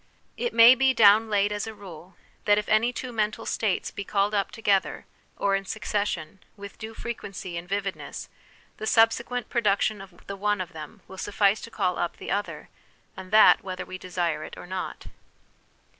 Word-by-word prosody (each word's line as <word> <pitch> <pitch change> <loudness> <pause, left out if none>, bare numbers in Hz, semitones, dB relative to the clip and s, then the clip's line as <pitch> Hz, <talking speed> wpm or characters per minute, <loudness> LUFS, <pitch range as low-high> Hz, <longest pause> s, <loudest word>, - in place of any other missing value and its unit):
It 480 - -2
may 230 +2 +9
be 260 0 +2
down 215 +1 +6
laid 205 0 +2
as 205 +1 -3
a 220 - -7
rule, 180 -2 -12 0.3
that 205 0 +5
if 210 - -1
any 220 +3 +3
two 250 0 -6
mental 215 0 -2
states 210 -4 -1
be 200 - -5
called 200 +1 0
up 200 -1 0
together, 195 -7 0 0.3
or 195 -1 +1
in 195 - -2
succession, 200 -4 -3 0.2
with 200 +1 -10
due 220 0 -8
frequency 195 -7 -6
and 170 +1 -6
vividness, 195 -7 -4 0.5
the 220 - -5
subsequent 235 +2 +2
production 210 -3 +1
of 190 -3 -15
the 200 - -6
one 205 +1 0
of 185 0 -5
them 155 -2 -10
will 190 - -11
suffice 205 0 +1
to - - -8
call 185 -5 -1
up 175 0 -2
the - - -6
other, 205 +1 -3 0.5
and 190 -1 -9
that 215 +2 +6
whether 185 -1 -5
we 185 - -8
desire 175 -4 -2
it - - -9
or - - -9
not. 185 +1 -5
200 Hz, 185 wpm, -26 LUFS, 185-220 Hz, 0.5 s, may